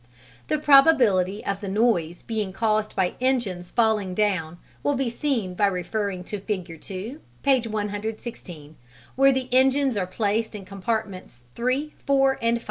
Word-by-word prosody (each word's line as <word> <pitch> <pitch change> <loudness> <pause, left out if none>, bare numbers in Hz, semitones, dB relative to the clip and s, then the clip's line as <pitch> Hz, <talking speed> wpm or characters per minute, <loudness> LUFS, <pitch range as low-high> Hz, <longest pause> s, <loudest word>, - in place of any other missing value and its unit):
The 305 - +1
probability 260 - +4
of 200 0 -2
the 200 - -5
noise 190 -5 +1
being 215 -4 -2
caused 215 0 0
by 180 -2 +1
engines 215 -9 0
falling 215 -5 +1
down 180 -6 0 0.2
will 285 - +1
be 260 -3 -1
seen 235 -8 -1
by 205 +3 +2
referring 195 0 -2
to 205 +3 -5
Figure 190 -4 -4
2, 200 - -7 0.2
page 260 -4 +3
116, 205 -7 -5 0.4
where 275 +1 +5
the 260 -1 -1
engines 265 0 +3
are 185 -2 -1
placed 215 +3 -1
in 200 -2 -8
compartments 195 - -4
3, 260 +5 -1
4, 270 -1 +3
and 230 +1 +2
5. - - -7
215 Hz, 150 wpm, -24 LUFS, 190-255 Hz, 0.4 s, where